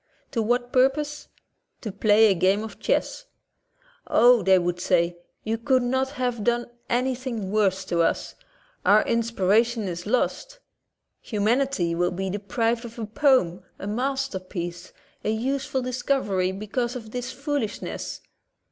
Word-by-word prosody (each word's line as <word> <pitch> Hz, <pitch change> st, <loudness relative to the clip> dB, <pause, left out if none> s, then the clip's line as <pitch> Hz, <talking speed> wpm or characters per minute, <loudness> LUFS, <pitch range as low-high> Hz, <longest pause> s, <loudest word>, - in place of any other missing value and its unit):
To 230 Hz, -, 0 dB
what 245 Hz, +2 st, 0 dB
purpose? 290 Hz, +3 st, +1 dB, 0.5 s
To 215 Hz, -, -4 dB
play 210 Hz, +2 st, +5 dB
a -, -, +5 dB
game 190 Hz, +4 st, +2 dB
of 220 Hz, -, -9 dB
chess. -, -, -1 dB, 0.8 s
"Oh," 245 Hz, -1 st, +6 dB
they 190 Hz, 0 st, +5 dB
would 175 Hz, 0 st, -1 dB
say, 175 Hz, -1 st, +1 dB, 0.3 s
"you 220 Hz, +1 st, -2 dB
could 255 Hz, +1 st, +2 dB
not 260 Hz, +2 st, 0 dB
have 245 Hz, -4 st, -2 dB
done 240 Hz, +1 st, +1 dB, 0.2 s
anything 245 Hz, -4 st, -1 dB
worse 195 Hz, -3 st, +1 dB
to 170 Hz, -2 st, 0 dB
us. 165 Hz, -, 0 dB, 0.5 s
Our 210 Hz, +1 st, +5 dB
inspiration 230 Hz, 0 st, +1 dB
is 175 Hz, +1 st, -5 dB
lost, -, -, -1 dB, 0.6 s
humanity 220 Hz, -4 st, 0 dB
will 175 Hz, +1 st, +1 dB
be 190 Hz, +1 st, -3 dB
de 205 Hz, -, -3 dB
prived 230 Hz, +4 st, -1 dB
of 235 Hz, 0 st, -9 dB
a 225 Hz, -, -3 dB
poem, 225 Hz, -, +2 dB, 0.2 s
a -, -, -7 dB
masterpiece, 195 Hz, -8 st, -3 dB, 0.3 s
a -, -, -1 dB
useful 260 Hz, +4 st, -1 dB
dis 255 Hz, 0 st, -3 dB
covery, 195 Hz, -10 st, +1 dB
becatise 225 Hz, +5 st, -3 dB
of 225 Hz, -3 st, -8 dB
this 250 Hz, +1 st, -4 dB
foolishness.'' 280 Hz, -6 st, -4 dB
225 Hz, 140 wpm, -25 LUFS, 190-255 Hz, 0.8 s, Oh